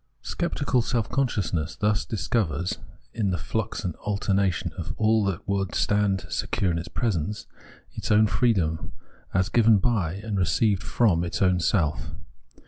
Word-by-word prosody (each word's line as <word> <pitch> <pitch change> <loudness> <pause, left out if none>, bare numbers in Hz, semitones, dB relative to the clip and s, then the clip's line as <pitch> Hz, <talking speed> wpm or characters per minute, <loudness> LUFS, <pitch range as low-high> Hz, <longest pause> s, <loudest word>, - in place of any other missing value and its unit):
Sceptical 145 -7 0
self 115 -1 -1
consciousness 95 - -1
thus 105 0 +1
discovers, 90 - -1 0.3
in 105 -4 0
the 90 - 0
flux 110 +8 -3
and 90 -4 -3
alternation 100 -2 0
of - - -5
all 110 0 +3
that 95 -3 -3
would 95 -2 -1
stand 95 +3 +1
secure 95 - -1
in 85 - -1
its 85 - -6
presence, 105 -1 -2 0.5
its - - -5
own 105 +1 +5
freedom, 95 - 0 0.4
as 95 0 +2
given 110 -1 +5
by 95 -6 0
and 100 +1 -3
received 95 +4 +2
from 95 -8 +2
its 85 - -3
own 90 -2 +3
self. 85 -3 0
100 Hz, 145 wpm, -26 LUFS, 90-110 Hz, 0.5 s, own